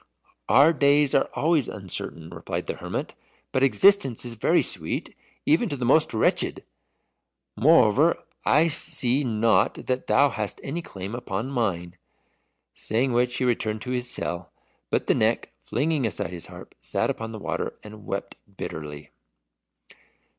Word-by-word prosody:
"Our 140 Hz, +8 st, +6 dB
days 145 Hz, -1 st, +4 dB
are -, -, +2 dB
always 155 Hz, -3 st, +2 dB
uncertain," 85 Hz, -4 st, -5 dB
replied 85 Hz, -1 st, -5 dB
the -, -, -3 dB
hermit; -, -, -5 dB, 0.4 s
"but 130 Hz, -, 0 dB
existence 135 Hz, -, +4 dB
is 120 Hz, -, -4 dB
very 110 Hz, -, +2 dB
sweet, -, -, -3 dB, 0.3 s
even 165 Hz, +9 st, +3 dB
to 145 Hz, -, -3 dB
the 125 Hz, -, -2 dB
most 155 Hz, +5 st, +4 dB
wretched. 110 Hz, -, +1 dB, 0.9 s
Moreover, 145 Hz, +3 st, +4 dB, 0.3 s
I 155 Hz, +4 st, +4 dB
see 135 Hz, -3 st, 0 dB
not 115 Hz, -2 st, +2 dB
that 130 Hz, 0 st, -2 dB
thou 145 Hz, +1 st, +4 dB
hast 105 Hz, -3 st, -4 dB
any 160 Hz, +5 st, -3 dB
claim 95 Hz, -, -8 dB
upon 120 Hz, +1 st, -4 dB
mine." 90 Hz, -8 st, -2 dB, 0.7 s
Saying 120 Hz, +4 st, -1 dB
which 125 Hz, +1 st, +1 dB
he 130 Hz, -, 0 dB
returned 110 Hz, -3 st, -1 dB
to 125 Hz, -, -5 dB
his 125 Hz, -1 st, -2 dB
cell, 90 Hz, 0 st, -4 dB, 0.4 s
but -, -, 0 dB
the -, -, +3 dB
Neck, -, -, 0 dB
flinging 150 Hz, -5 st, 0 dB
aside 90 Hz, -4 st, -4 dB
his 85 Hz, -2 st, -8 dB
harp, -, -, -12 dB
sat -, -, -1 dB
upon 115 Hz, 0 st, -6 dB
the 110 Hz, -, -7 dB
water, 105 Hz, -, -4 dB
and 105 Hz, 0 st, -11 dB
wept 100 Hz, 0 st, -4 dB, 0.2 s
bitterly. 75 Hz, -1 st, -7 dB
120 Hz, 145 wpm, -25 LUFS, 105-140 Hz, 0.9 s, Our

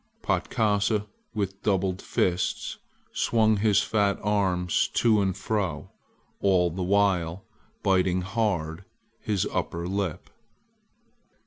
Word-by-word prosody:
Patkasa, 105 Hz, -1 st, +1 dB, 0.3 s
with 100 Hz, -2 st, -3 dB
doubled 95 Hz, -2 st, 0 dB
fists, 90 Hz, -1 st, -1 dB, 0.3 s
swung 110 Hz, -2 st, +2 dB
his 105 Hz, 0 st, +3 dB
fat 100 Hz, -2 st, +1 dB
arms 95 Hz, -4 st, +1 dB
to 110 Hz, -3 st, +4 dB
and 95 Hz, -2 st, 0 dB
fro, 95 Hz, -8 st, -2 dB, 0.5 s
all 90 Hz, -3 st, +3 dB
the 90 Hz, +3 st, -5 dB
while 95 Hz, -2 st, +1 dB, 0.4 s
biting 95 Hz, -1 st, +2 dB
hard 95 Hz, -4 st, -1 dB, 0.4 s
his 100 Hz, -3 st, 0 dB
under 85 Hz, +1 st, -2 dB
lip. 95 Hz, -3 st, -3 dB
95 Hz, 100 wpm, -26 LUFS, 90-105 Hz, 0.5 s, to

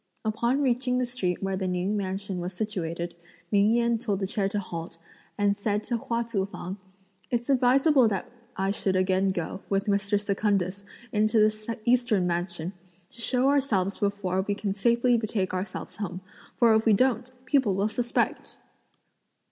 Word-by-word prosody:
Upon 235 Hz, +6 st, +1 dB
reaching 250 Hz, 0 st, +1 dB
the 250 Hz, -, +1 dB
street 200 Hz, -8 st, -2 dB
where 195 Hz, 0 st, 0 dB
the 190 Hz, 0 st, -2 dB
Ning 180 Hz, +3 st, -1 dB
mansion 195 Hz, -1 st, -3 dB
was 180 Hz, +2 st, -4 dB
situated, 175 Hz, -4 st, -3 dB, 0.4 s
Ming 205 Hz, +2 st, +4 dB
Yen 235 Hz, -1 st, +2 dB
told 210 Hz, -5 st, -1 dB
the 195 Hz, -, -1 dB
chair 195 Hz, 0 st, 0 dB
to 205 Hz, -, -2 dB
halt, 170 Hz, -4 st, -5 dB, 0.4 s
and 205 Hz, -1 st, +2 dB
said 205 Hz, +1 st, -1 dB
to 240 Hz, -, -1 dB
Hua 230 Hz, +1 st, -1 dB
Tzu 205 Hz, -5 st, -2 dB
fang, 190 Hz, -1 st, -6 dB, 0.5 s
"It's 240 Hz, +2 st, 0 dB
advisable 265 Hz, +1 st, +5 dB
that 200 Hz, -3 st, -2 dB, 0.3 s
I 195 Hz, +1 st, +1 dB
should 195 Hz, -1 st, 0 dB
again 185 Hz, +1 st, +2 dB
go, 185 Hz, +1 st, -3 dB
with 195 Hz, 0 st, +1 dB
Mr. 200 Hz, 0 st, +1 dB
Secundus, 200 Hz, -2 st, 0 dB, 0.3 s
into 215 Hz, +1 st, +2 dB
the 215 Hz, +1 st, +1 dB
Eastern 235 Hz, -6 st, +3 dB
mansion, 175 Hz, 0 st, -2 dB, 0.4 s
to 235 Hz, -, -11 dB
show 255 Hz, +2 st, +2 dB
ourselves 215 Hz, -10 st, +1 dB
before 200 Hz, -2 st, 0 dB
we 205 Hz, +1 st, -2 dB
can 200 Hz, -1 st, -2 dB
safely 235 Hz, +4 st, +3 dB
betake 210 Hz, -4 st, -1 dB
ourselves 185 Hz, +1 st, -4 dB
home; 185 Hz, -3 st, -4 dB, 0.4 s
for 235 Hz, -2 st, +5 dB
if 220 Hz, 0 st, +3 dB
we 220 Hz, -, +6 dB
don't, 250 Hz, +2 st, +2 dB, 0.2 s
people 260 Hz, -7 st, +2 dB
will 200 Hz, +2 st, +1 dB
suspect!" 240 Hz, +2 st, -1 dB
205 Hz, 165 wpm, -27 LUFS, 190-235 Hz, 0.5 s, we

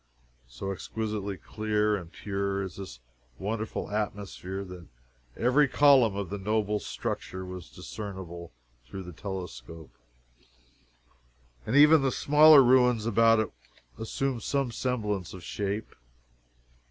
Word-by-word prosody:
So -, -, -5 dB
exquisitely 105 Hz, 0 st, -4 dB
clear 105 Hz, +3 st, 0 dB
and 85 Hz, -4 st, -7 dB
pure 100 Hz, -1 st, -2 dB
is 95 Hz, -3 st, -7 dB
this 95 Hz, -11 st, -8 dB, 0.4 s
wonderful 110 Hz, +1 st, -4 dB
atmosphere 100 Hz, -2 st, -4 dB
that 90 Hz, -2 st, -10 dB, 0.5 s
every 130 Hz, +5 st, +4 dB
column 130 Hz, -6 st, +5 dB
of 100 Hz, -3 st, -4 dB
the 100 Hz, -, -4 dB
noble 105 Hz, +1 st, 0 dB
structure 95 Hz, -2 st, -5 dB
was 90 Hz, -2 st, -8 dB
discernible 95 Hz, -5 st, -8 dB, 0.4 s
through 95 Hz, +10 st, -7 dB
the 90 Hz, -1 st, -9 dB
telescope, 85 Hz, -, -8 dB, 1.7 s
and 115 Hz, -, 0 dB
even 150 Hz, +1 st, +7 dB
the 135 Hz, -1 st, +1 dB
smaller 150 Hz, +1 st, +7 dB
ruins 125 Hz, -3 st, +4 dB
about 115 Hz, 0 st, +4 dB
it 110 Hz, -, -4 dB, 0.5 s
assumed 125 Hz, +2 st, -2 dB
some 135 Hz, +1 st, -1 dB
semblance 105 Hz, -8 st, -2 dB
of 90 Hz, -, -11 dB
shape. 100 Hz, +4 st, -4 dB
105 Hz, 115 wpm, -28 LUFS, 95-115 Hz, 1.7 s, even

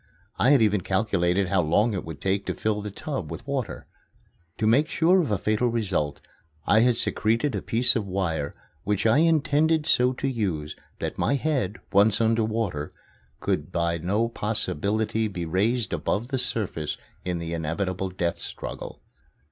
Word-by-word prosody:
I 125 Hz, -, +4 dB
had 140 Hz, -5 st, +6 dB
even 105 Hz, -2 st, +2 dB
calculated 95 Hz, -2 st, +1 dB
how 95 Hz, -2 st, +3 dB
long 105 Hz, +8 st, +2 dB
it 95 Hz, -, -3 dB
would 80 Hz, -2 st, -8 dB
take 95 Hz, +1 st, 0 dB
to -, -, -1 dB
fill 105 Hz, -1 st, -1 dB
the 105 Hz, -, -5 dB
tub 135 Hz, +7 st, -5 dB
with -, -, -7 dB
water. 135 Hz, -7 st, -3 dB, 0.7 s
To 110 Hz, -, -1 dB
make 130 Hz, +8 st, +4 dB
sure 175 Hz, +4 st, +3 dB
of 155 Hz, -, -2 dB
a 105 Hz, -, +1 dB
fatal 110 Hz, +5 st, +1 dB
result, 95 Hz, -11 st, -1 dB, 0.4 s
I 110 Hz, -, +5 dB
had 120 Hz, 0 st, +4 dB
secreted 115 Hz, +7 st, +1 dB
a 100 Hz, -, -2 dB
piece 125 Hz, +3 st, +2 dB
of 110 Hz, -4 st, -1 dB
wire 85 Hz, -6 st, -2 dB, 0.3 s
which 105 Hz, +1 st, -1 dB
I 115 Hz, +6 st, +5 dB
intended 155 Hz, -1 st, +3 dB
so 125 Hz, -4 st, +4 dB
to 135 Hz, -, -3 dB
use 90 Hz, -, -2 dB, 0.2 s
that -, -, -4 dB
my 140 Hz, -, +2 dB
head, 135 Hz, -9 st, -1 dB, 0.2 s
once 100 Hz, +2 st, +4 dB
under 115 Hz, 0 st, +2 dB
water, 110 Hz, -9 st, -2 dB, 0.5 s
could 75 Hz, +4 st, -1 dB
by 85 Hz, -1 st, 0 dB
no 100 Hz, +8 st, +1 dB
possibility 110 Hz, 0 st, -1 dB
be 90 Hz, -4 st, -4 dB
raised 105 Hz, +6 st, 0 dB
above 105 Hz, +8 st, -1 dB
the 135 Hz, -2 st, -1 dB
surface 95 Hz, -11 st, -1 dB, 0.3 s
in 90 Hz, -1 st, -2 dB
the 85 Hz, 0 st, -4 dB
inevitable 90 Hz, +4 st, -2 dB
death 90 Hz, -2 st, -2 dB
struggle. -, -, -7 dB
105 Hz, 170 wpm, -25 LUFS, 90-120 Hz, 0.7 s, had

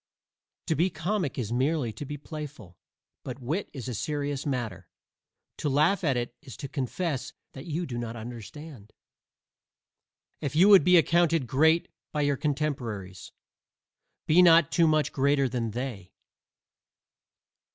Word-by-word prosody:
To 165 Hz, -, +1 dB
be 170 Hz, +4 st, +2 dB
comic 180 Hz, -4 st, -2 dB
is 120 Hz, -3 st, -2 dB
merely 130 Hz, -2 st, 0 dB
to 145 Hz, -, -7 dB
be 145 Hz, +2 st, -6 dB
playful, 145 Hz, -, -9 dB, 0.5 s
but 130 Hz, -2 st, -6 dB
wit 150 Hz, +10 st, -3 dB
is 130 Hz, -3 st, -7 dB
a 125 Hz, -, -3 dB
serious 145 Hz, +3 st, -3 dB
matter. 110 Hz, -10 st, -3 dB, 0.7 s
To 150 Hz, -, -1 dB
laugh 155 Hz, +8 st, +2 dB
at 140 Hz, -6 st, +2 dB
it 120 Hz, 0 st, -3 dB
is 130 Hz, -, -11 dB
to 140 Hz, -, -6 dB
confess 135 Hz, +1 st, -3 dB, 0.2 s
that 135 Hz, +4 st, -10 dB
you 165 Hz, +2 st, -2 dB
do 120 Hz, -5 st, -5 dB
not 120 Hz, -1 st, -5 dB
understand. 120 Hz, +1 st, -9 dB, 1.5 s
If 140 Hz, 0 st, -3 dB
you 185 Hz, +6 st, +6 dB
would 195 Hz, -6 st, +8 dB
be 180 Hz, +2 st, +6 dB
accounted 165 Hz, -2 st, +3 dB
great 160 Hz, +7 st, +3 dB, 0.2 s
by 150 Hz, -, -1 dB
your 145 Hz, -1 st, +2 dB
contemporaries, 130 Hz, -, -3 dB, 0.9 s
be 165 Hz, +4 st, +5 dB
not 170 Hz, -3 st, +6 dB
too 170 Hz, -2 st, +4 dB
much 155 Hz, -1 st, +2 dB
greater 140 Hz, 0 st, +2 dB
than 120 Hz, -2 st, -2 dB
they. 110 Hz, -6 st, -6 dB
140 Hz, 140 wpm, -27 LUFS, 120-160 Hz, 1.5 s, would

